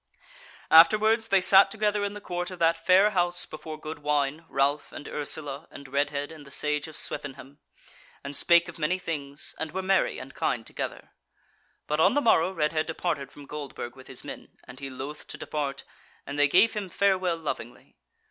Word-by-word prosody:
Afterwards 215 +7 +6
they 195 -4 +4
sat 195 +2 +7
together 210 -1 0
in 200 0 -2
the 210 - -8
court 180 -2 -4
of 185 - -8
that 165 0 +2
fair 190 +3 +6
house 175 -2 +1
before 155 0 -8
good 155 0 -7
wine, 150 +1 0
Ralph 140 +2 0
and 145 - -9
Ursula, 145 -1 -3
and 140 - -11
Redhead 145 +2 -1
and 155 -2 -11
the 140 - -14
Sage 150 +2 0
of 155 - -9
Swevenham, 140 0 -4 0.6
and 140 0 -6
spake 170 +2 +4
of 170 -1 -10
many 160 +4 +1
things, 150 -5 -5
and 160 -1 -3
were 190 +1 -2
merry 190 0 +2
and 130 +1 -9
kind 115 -2 -1
together. - - -6 0.7
But 150 +1 -1
on 190 +7 +4
the - - +4
morrow 185 - +4
Redhead 155 -2 0
departed 160 -3 -3
from 145 - -12
Goldburg 140 -4 -7
with 130 -1 -14
his - - -4
men, - - -10
and 125 +1 -12
he 140 -1 -6
loth 135 +3 -7
to - - -8
depart, 140 -2 -4 0.4
and 140 +1 -5
they 145 - +6
gave 190 +10 +5
him 205 -3 -4
farewell 185 -2 +1
lovingly. 140 -6 -6
155 Hz, 185 wpm, -27 LUFS, 145-185 Hz, 0.7 s, sat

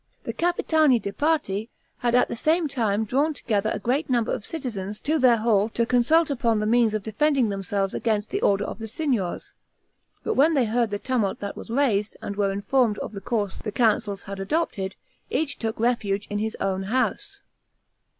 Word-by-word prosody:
The - - -4
Capitani 315 -6 +2
di 200 - -4
Parte 235 -7 0 0.3
had 240 0 +1
at 250 - +4
the - - -4
same 315 +7 +2
time 220 -5 0
drawn 285 +7 +1
together 215 -4 0
a - - -1
great 255 +10 -1
number 240 -3 +1
of - - -3
citizens 215 -9 -5
to 310 +2 +1
their 250 -3 +5
hall 215 -2 +2
to 235 +1 0
consult 285 +7 +3
upon 235 -4 +1
the 210 - 0
means 225 -1 +3
of 215 - -2
defending 265 +2 +1
themselves 195 0 -2
against 215 -2 -1
the 400 +2 -1
orders 200 0 +2
of - - -6
the 225 - -5
Signors, 230 - -2 0.7
but - - 0
when 310 +4 +4
they 260 -4 +3
heard 230 +1 +1
the 205 - -2
tumult 225 -4 -1
that 200 0 -4
was - - -9
raised, 225 -5 +1
and 200 - -5
were 200 -1 +1
informed 210 +3 +1
of - - -5
the 200 -2 -7
course 205 -2 -2
the 210 - -5
Councils 210 -3 +1
had 195 0 -7
adopted, 195 - -2 0.3
each 310 -2 -1
took 225 -1 -3
refuge 210 -4 0
in 205 - -1
his 220 +1 -3
own 190 -1 -1
house. 255 +3 -1
225 Hz, 195 wpm, -25 LUFS, 205-265 Hz, 0.7 s, their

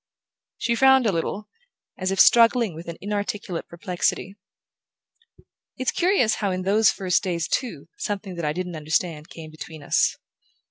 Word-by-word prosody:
She 235 - 0
frowned 265 +1 +5
a 215 - +3
little, 190 +4 -3 0.5
as 185 0 -2
if 195 0 -1
struggling 230 -2 +5
with 165 +2 -10
an 170 - -6
inarticulate 205 -3 -3
perplexity. 180 +2 -2 1.4
"It's 255 -1 0
curious 350 - +2
how, 200 - +1
in 185 0 -2
those 205 +3 +4
first 185 -2 +1
days, 175 -4 -2
too, 190 - -3
something 200 -2 -4
that 170 -2 -4
I 150 - +1
didn't 180 0 -4
understand 155 0 -2
came 160 -2 -10
between 155 -1 -10
us." - - +2
190 Hz, 150 wpm, -24 LUFS, 170-215 Hz, 1.4 s, frowned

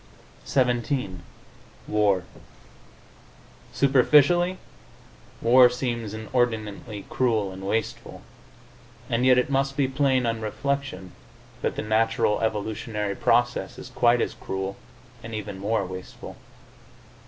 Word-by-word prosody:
XVII 125 - 0 0.7
WAR 100 -3 +2 1.5
Superficially, 150 +7 +4 0.9
war 125 +1 +7
seems 120 -4 -3
inordinately 110 -2 -2
cruel 110 -6 0
and 95 0 -9
wasteful, 110 +2 -3 0.9
and 120 +2 +2
yet 130 -1 +6
it 125 +2 +1
must 135 0 0
be 140 -2 +2
plain 130 -2 +1
on 115 -1 -1
reflection 110 -4 -3 0.5
that - - -1
the - - -3
natural 110 0 +1
evolutionary 105 -1 -2
process 120 +3 +1
is - - -9
quite 120 0 +3
as - - -1
cruel 95 0 -4 0.5
and 110 0 -7
even 105 -2 -6
more 100 0 0
wasteful. 95 0 -9
115 Hz, 105 wpm, -25 LUFS, 105-130 Hz, 1.5 s, war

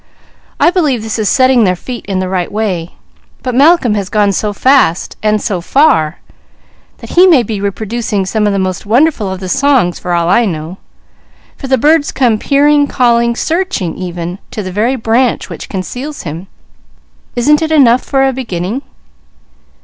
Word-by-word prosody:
I - - +4
believe 295 - 0
this 220 +1 -4
is 210 - 0
setting 255 -3 +3
their 185 -3 +2
feet 240 +6 -8
in 195 -2 -2
the 185 0 -2
right 185 -2 -2
way. 190 -6 -3 0.5
But 255 - -2
Malcolm 280 -2 +4
has 200 -3 -3
gone 205 -1 +2
so 210 +2 -1
fast 230 -6 +2
and 215 0 +1
so 195 -4 -3
far, 185 - +2 0.8
that - - -11
he 360 +2 +5
may 305 -9 +5
be 210 -2 -4
reproducing 210 0 -2
some 210 +2 0
of - - +1
the 200 - -1
most 185 -1 -2
wonderful 235 -1 +1
of 190 - -5
the 185 - -6
songs, 265 -5 +1
for 180 - -3
all 170 -1 +1
I 215 +6 +3
know, 165 -1 -5 0.8
for 270 - -8
the 265 0 +2
birds 295 +4 +2
come 235 -5 +1
peering, 290 +2 +3
calling, 235 -2 +1
searching, 330 - -2
even 175 0 -6
to 210 - -5
the 185 - -6
very 225 +7 0
branch 240 +1 0
which - - -8
conceals 250 +10 -6
him. 165 +4 -7 0.9
Isn't 295 +6 +3
it 320 0 -2
enough 255 -5 +4
for 270 -1 +1
a 265 - -1
beginning?" 225 -1 -4
225 Hz, 175 wpm, -13 LUFS, 190-270 Hz, 0.9 s, he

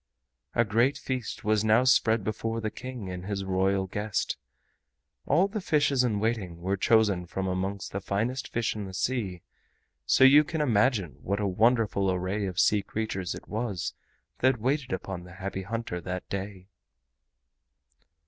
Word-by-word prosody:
A 120 - +4
great 115 +7 +2
feast 130 -3 -4
was 105 0 +2
now 110 +3 +4
spread 115 -4 +4
before 115 +2 -2
the 110 -1 -3
King 125 -5 -7
and 90 +1 -6
his 100 -1 -2
Royal 95 +1 +1
guest. 105 +2 -2 0.9
All 175 +7 +4
the 210 +1 -4
fishes 145 -6 +2
in 110 -5 +1
waiting 105 -6 -2
were 95 +3 -1
chosen 100 -3 +3
from 95 +2 -3
amongst 95 +2 -3
the 100 - -3
finest 115 +7 -2
fish 115 -2 -1
in 105 -2 -4
the 95 -1 -8
sea, 95 -3 -2 0.6
so 70 - +5
you 140 +3 +8
can 160 +1 -4
imagine 110 - +1
what 100 +2 -1
a 105 - 0
wonderful 105 0 +2
array 95 +3 -1
of 90 0 -3
sea 105 +3 +4
creatures 95 -3 -3
it - - -11
was 105 -5 -3 0.5
that 130 -2 +3
waited 130 +3 0
upon 95 -1 -4
the 90 0 -12
Happy 95 0 -4
Hunter 115 -3 -4
that 90 +1 -5
day. 95 -1 -5
105 Hz, 160 wpm, -28 LUFS, 95-120 Hz, 0.9 s, you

